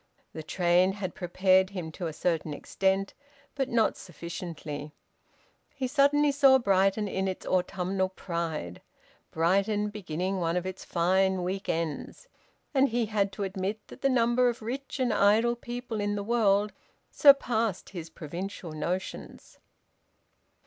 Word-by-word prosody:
The 160 - -6
train 180 +3 +2
had 195 -3 -5
prepared 185 +1 +2
him 180 -5 -6
to 175 +1 -5
a - - -3
certain 160 -1 -1
extent, 195 +5 0 0.4
but 270 -2 -2
not 230 -2 +2
sufficiently. 165 -4 -7 0.8
He 265 -2 -2
suddenly 285 +2 +3
saw 275 -2 +6
Brighton 195 -2 +2
in 190 0 -1
its 185 - -4
autumnal 185 +1 0
pride, 170 - -4 0.5
Brighton 200 +5 +1
beginning 185 -1 -3
one 170 0 0
of 180 - -2
its 185 0 -6
fine 185 +2 +1
week 190 +2 -3
ends, 165 - -3 0.5
and 275 0 +4
he 235 0 0
had 205 -2 0
to 200 - -4
admit 195 +2 -3
that - - -12
the 275 - +3
number 245 0 +3
of 235 -2 -5
rich 270 +5 -5
and 250 -3 +1
idle 220 +4 +4
people 240 -2 -5
in 205 0 -1
the 200 - -3
world 210 -2 +2 0.4
surpassed 235 - +4
his 170 -4 -7
provincial 170 +3 -6
notions. 175 +5 -5
195 Hz, 140 wpm, -28 LUFS, 175-225 Hz, 0.8 s, saw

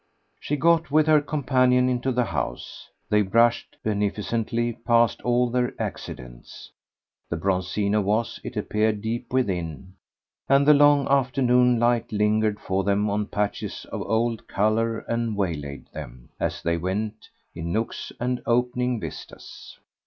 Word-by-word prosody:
She 150 - -2
got 165 +2 +3
with 155 +1 +4
her 155 -1 +5
companion 130 -4 +2
into 130 +1 0
the 125 0 +1
house; 70 - -5 0.2
they 105 0 +3
brushed, 115 +4 +2
beneficently, 110 +3 -1
past 115 0 +2
all 120 0 +1
their 125 0 -1
accidents. - - -7 0.6
The 85 - -2
Bronzino 95 +4 0
was, 105 +4 -1
it - - -7
appeared, 105 -1 0
deep 120 +2 -4
within, 95 - -2 0.6
and 140 +1 +4
the 150 - +9
long 145 -1 +5
afternoon 125 -2 +3
light 120 0 +1
lingered 105 0 +1
for 95 +1 -1
them 100 +1 +1
on 105 0 -1
patches 105 -1 -3
of - - -4
old 115 +1 -1
colour 110 +2 0
and 115 -2 -2
waylaid 75 -8 -3
them, - - -9
as - - -2
they 85 0 +1
went, 105 +5 -4 0.2
in 85 0 -5
nooks 110 +4 -3
and 125 0 -1
opening 125 0 +1
vistas. - - -10
115 Hz, 140 wpm, -24 LUFS, 100-125 Hz, 0.6 s, the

